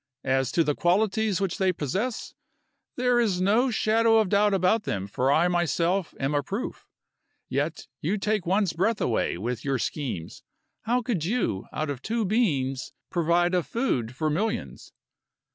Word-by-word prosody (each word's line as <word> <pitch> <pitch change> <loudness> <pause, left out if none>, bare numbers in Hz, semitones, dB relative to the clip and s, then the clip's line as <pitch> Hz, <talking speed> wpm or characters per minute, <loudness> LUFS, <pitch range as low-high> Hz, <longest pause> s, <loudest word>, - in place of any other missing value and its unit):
As 135 -1 +1
to 165 - +4
the 150 - +1
qualities 200 +4 +1
which 195 -3 -2
they 190 -1 +3
possess, 190 - -3 0.6
there 250 -1 +2
is 205 -6 +1
no 215 +8 +3
shadow 225 0 +3
of 215 -4 +2
doubt 205 +1 +3
about 195 +3 +2
them 100 - -3
for 125 +7 0
I 160 +4 +4
myself 175 +1 0
am 135 +2 -1
a 145 - +2
proof. 200 - -5 0.6
Yet - - -2 0.2
you 210 - 0
take 210 -1 0
one's 190 +1 +1
breath 205 +6 +1
away 115 - 0
with 115 +5 -3
your 135 -2 0
schemes. 125 - -4 0.4
How 245 +2 +1
could 215 -10 -1
you, 190 - -1
out 155 -1 -2
of 135 -3 -6
two 225 +4 -1
beans, 145 - 0 0.2
provide 175 +1 +2
a 180 - +3
food 130 - -2
for 155 +3 0
millions?" 215 +9 -3
180 Hz, 160 wpm, -26 LUFS, 145-215 Hz, 0.6 s, to